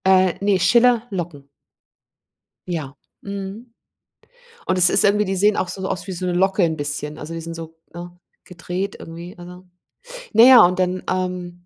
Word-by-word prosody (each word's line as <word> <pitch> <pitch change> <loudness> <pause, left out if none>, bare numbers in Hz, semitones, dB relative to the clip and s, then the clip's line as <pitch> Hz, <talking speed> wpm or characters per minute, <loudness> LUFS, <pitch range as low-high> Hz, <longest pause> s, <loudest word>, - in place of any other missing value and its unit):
Äh, 185 -1 +4
ne, 200 -2 +2
Schiller 235 +5 +3
Locken. 170 -7 -6 1.2
Ja. 155 -6 -5 0.3
Mhm. 200 +4 -8 0.9
Und 185 - 0
es 180 -1 +5
ist - - +3
irgendwie 210 +1 +3
die 195 -1 -3
sehen 205 +2 +3
auch 185 - -1
so 190 +1 -5
aus, 185 - -4
wie 190 - -5
so 180 +1 -5
'ne 180 - -1
Locke 190 +2 +1
'n 160 -2 +1
bisschen, 145 0 -5
also 155 +2 -7
die 165 - -5
sind 165 0 -7
so, 165 0 -9 0.2
ne, 175 +1 -9 0.3
gedreht 180 +2 -5
irgendwie, 170 +2 -10
also. 180 +1 -12 0.7
Na 225 - +7
ja, 250 -2 +9
und 180 +2 -1
dann, 185 0 -1
ähm 180 -1 -4
180 Hz, 175 wpm, -20 LUFS, 170-195 Hz, 1.2 s, ja